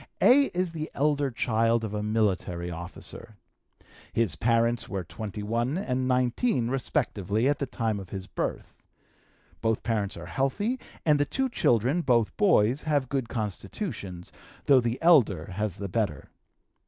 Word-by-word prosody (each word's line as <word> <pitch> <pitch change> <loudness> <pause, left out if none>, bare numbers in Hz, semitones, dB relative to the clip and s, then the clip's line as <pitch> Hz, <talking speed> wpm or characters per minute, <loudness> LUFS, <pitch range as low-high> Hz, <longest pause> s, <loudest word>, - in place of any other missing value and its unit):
"A. 280 +3 +6
is 180 -6 -2
the 155 -1 -5
elder 145 -1 +1
child 115 -1 +1
of 110 -2 -4
a 105 - -2
military 95 -5 0
officer. 90 +6 -8 0.7
His 115 -8 +1
parents 115 0 +1
were 95 -1 -3
21 110 - -3
and 130 -8 -1
19, 125 - +1
respectively, 120 - 0
at 145 - +1
the 140 - -2
time 110 -4 -1
of 95 -2 -9
his 95 -2 -6
birth. 95 - -5 0.8
Both 110 -1 0
parents 105 -6 -1
are 85 - -8
healthy, 135 - -1 0.3
and 150 -2 +4
the 145 - +3
two 265 - -1
children 125 - +2
(both 120 -7 +2
boys) 145 - +3
have 145 -5 0
good 135 -4 -2
constitutions, 100 - -5 0.3
though 135 -3 +6
the 120 +1 -2
elder 105 - +4
has 100 0 -2
the 100 - -4
better. 95 - -2
115 Hz, 145 wpm, -27 LUFS, 105-140 Hz, 0.8 s, A